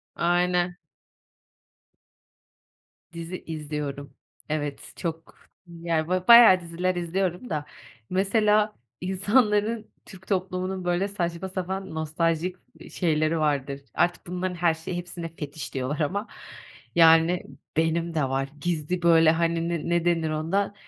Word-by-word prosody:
Aynen. 175 Hz, 0 st, +1 dB, 2.4 s
Dizi 170 Hz, +2 st, -7 dB
izliyorum. 150 Hz, -3 st, -5 dB, 0.4 s
Evet, 145 Hz, -2 st, -4 dB
çok, 165 Hz, -2 st, -5 dB, 0.3 s
yani, 165 Hz, -2 st, -2 dB
böyle, 185 Hz, 0 st, -1 dB
bayağı 235 Hz, -6 st, +9 dB
diziler 175 Hz, +2 st, -2 dB
izliyorum 180 Hz, +5 st, -2 dB
da, 150 Hz, -1 st, -2 dB, 0.4 s
mesela 210 Hz, +2 st, +2 dB, 0.3 s
insanların, 210 Hz, +3 st, +1 dB
Türk 190 Hz, -1 st, -14 dB
toplumunun, 185 Hz, -1 st, -2 dB
böyle, 175 Hz, +3 st, +1 dB
saçma 175 Hz, -2 st, -3 dB
sapan, 190 Hz, -1 st, -4 dB
nostaljik, 165 Hz, +3 st, -1 dB, 0.2 s
iii -, -, -12 dB
şeyleri 155 Hz, -1 st, +1 dB
vardır. 140 Hz, -2 st, -1 dB
Artık 175 Hz, 0 st, 0 dB
bunların 180 Hz, 0 st, -3 dB
her 170 Hz, -1 st, +2 dB
şeyi 160 Hz, +2 st, -5 dB
hepsine 170 Hz, -2 st, -6 dB
fetiş 150 Hz, -1 st, -7 dB
diyorlar 135 Hz, +4 st, -2 dB
ama, 200 Hz, +9 st, -1 dB, 0.7 s
yani, 165 Hz, +1 st, +5 dB, 0.3 s
benim 165 Hz, +1 st, +1 dB
de 155 Hz, -, +1 dB
var. 135 Hz, +1 st, -1 dB
Gizli, 175 Hz, +1 st, -2 dB
böyle, 165 Hz, -2 st, +6 dB
hani, 165 Hz, 0 st, 0 dB
ne 170 Hz, -2 st, -2 dB
ne 170 Hz, 0 st, +1 dB
denir 165 Hz, -2 st, +1 dB
ona? 165 Hz, +7 st, -1 dB
170 Hz, 120 wpm, -26 LUFS, 160-185 Hz, 2.4 s, bayağı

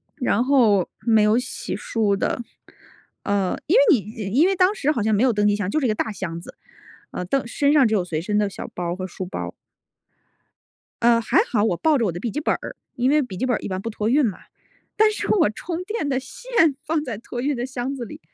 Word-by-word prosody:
然 250 Hz, -5 st, +1 dB
后 230 Hz, -9 st, +3 dB, 0.2 s
没 220 Hz, -2 st, +4 dB
有 215 Hz, +3 st, +4 dB
洗 250 Hz, -, -5 dB
漱 205 Hz, -4 st, 0 dB
的。 230 Hz, -, -1 dB, 0.8 s
呃， 200 Hz, -2 st, 0 dB
因 350 Hz, -, +3 dB
为 -, -, +7 dB
你 -, -, 0 dB, 0.4 s
因 330 Hz, -, +6 dB
为 390 Hz, -, +1 dB
当 370 Hz, +3 st, +3 dB
时 300 Hz, -6 st, +1 dB
好 240 Hz, -8 st, -1 dB
像 215 Hz, 0 st, +2 dB
没 220 Hz, -, +2 dB
有 255 Hz, -, +4 dB
登 205 Hz, 0 st, +2 dB
机 205 Hz, -, +3 dB
箱， 205 Hz, -3 st, -2 dB
就 310 Hz, -, +1 dB
是 275 Hz, -, -1 dB
一 240 Hz, -, +2 dB
个 215 Hz, -, +1 dB
大 220 Hz, -, -2 dB
箱 170 Hz, -4 st, -5 dB
子， -, -, -12 dB, 0.6 s
呃， -, -, -4 dB
登 250 Hz, +7 st, -1 dB
身 280 Hz, +4 st, +1 dB
上 275 Hz, -6 st, +5 dB
只 220 Hz, -, -1 dB
有 185 Hz, -, +1 dB
随 165 Hz, -3 st, -3 dB
身 210 Hz, +4 st, -1 dB
的 210 Hz, -1 st, +1 dB
小 190 Hz, -, -7 dB
包 175 Hz, 0 st, -2 dB
和 185 Hz, 0 st, -4 dB
书 185 Hz, +1 st, -6 dB
包。 90 Hz, -, -6 dB, 1.5 s
呃， 235 Hz, 0 st, +5 dB
还 220 Hz, -, +1 dB
好， 210 Hz, -4 st, +2 dB
我 195 Hz, -6 st, +1 dB
抱 315 Hz, -, +3 dB
着 235 Hz, -, +1 dB
我 190 Hz, -, 0 dB
的 175 Hz, -, -6 dB
笔 230 Hz, +2 st, -3 dB
记 295 Hz, -, -2 dB
本 300 Hz, -, +1 dB
儿， -, -, -8 dB, 0.2 s
因 250 Hz, +2 st, +1 dB
为 300 Hz, +1 st, +4 dB
笔 200 Hz, -9 st, -6 dB
记 255 Hz, -, -1 dB
本 245 Hz, -, +1 dB
儿 -, -, -3 dB
一 -, -, -6 dB
般 185 Hz, 0 st, -3 dB
不 230 Hz, -, -4 dB
托 215 Hz, -1 st, -3 dB
运 285 Hz, +2 st, +4 dB
嘛， 205 Hz, -5 st, -3 dB, 0.6 s
但 430 Hz, 0 st, +4 dB
是 425 Hz, -, -4 dB
我 335 Hz, -, +4 dB
充 335 Hz, -, -5 dB
电 420 Hz, -6 st, -3 dB
的 265 Hz, -2 st, 0 dB
线 325 Hz, -, 0 dB
放 310 Hz, -1 st, -1 dB
在 240 Hz, -7 st, -5 dB
托 240 Hz, +2 st, -6 dB
运 285 Hz, +2 st, 0 dB
的 245 Hz, 0 st, -3 dB
箱 260 Hz, +1 st, -4 dB
子 245 Hz, -, -5 dB
里。 -, -, -10 dB
235 Hz, 270 characters per minute, -22 LUFS, 205-285 Hz, 1.5 s, 为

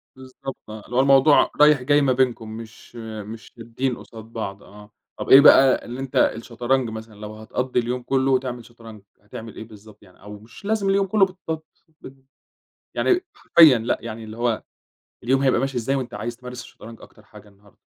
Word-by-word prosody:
بالضبط 130 Hz, 0 st, -9 dB
آه، 110 Hz, 0 st, -8 dB
اللي 120 Hz, -, -8 dB
هو -, -, +3 dB
الموضوع 135 Hz, +2 st, +5 dB
رايح 150 Hz, -3 st, +6 dB
جاي 145 Hz, +3 st, +3 dB
ما 135 Hz, -2 st, +2 dB
بينكم، 125 Hz, -4 st, 0 dB
مش 115 Hz, +1 st, -13 dB
مش 110 Hz, -1 st, -9 dB
شادّين 120 Hz, +2 st, -3 dB
قصاد 110 Hz, -1 st, -12 dB
بعض، 110 Hz, -3 st, -7 dB
آه. 105 Hz, +1 st, -15 dB, 0.3 s
طَب -, -, -5 dB
إيه 135 Hz, -, +10 dB
بقى 135 Hz, -2 st, +6 dB
اللي 120 Hz, +2 st, -7 dB
أنت 135 Hz, -1 st, -7 dB
الشطرنج 120 Hz, +2 st, 0 dB
مثلًا 110 Hz, 0 st, -9 dB
لو 105 Hz, +1 st, -9 dB
هتقضّي 125 Hz, +4 st, -2 dB
اليوم 125 Hz, +1 st, -3 dB
كلّه 135 Hz, 0 st, +1 dB
تعمل 125 Hz, -2 st, -7 dB
شطرنج، 115 Hz, -3 st, -14 dB, 0.2 s
هتعمل 110 Hz, +1 st, -10 dB
إيه -, -, -8 dB
بالضبط 105 Hz, -1 st, -16 dB
يعني؟ 90 Hz, -2 st, -21 dB
أو 105 Hz, +1 st, -10 dB
مش 115 Hz, -, -16 dB
لازم 210 Hz, -2 st, 0 dB
اليوم 195 Hz, 0 st, +2 dB
كلّه 195 Hz, 0 st, +4 dB
بالت 170 Hz, -4 st, -7 dB, 0.4 s
بال 130 Hz, -, -11 dB, 0.8 s
يعني 365 Hz, -1 st, +2 dB
حرفيًا 155 Hz, -7 st, +6 dB
لأ، 115 Hz, +2 st, -1 dB
يعني 115 Hz, -1 st, -8 dB
اللي 110 Hz, 0 st, -10 dB
هو 120 Hz, -2 st, -1 dB, 0.6 s
اليوم 135 Hz, +3 st, +1 dB
هيبقى 130 Hz, -3 st, +2 dB
ماشي 135 Hz, -1 st, -3 dB
إزاي 130 Hz, +4 st, -1 dB
وأنت 130 Hz, -3 st, -5 dB
عايز 115 Hz, +3 st, -5 dB
تمارس 125 Hz, 0 st, -9 dB
الشطرنج 115 Hz, 0 st, -13 dB
أكتر 110 Hz, -, -17 dB
حاجة 105 Hz, 0 st, -16 dB
النهارده؟ 100 Hz, 0 st, -24 dB
120 Hz, 190 wpm, -22 LUFS, 110-135 Hz, 0.8 s, إيه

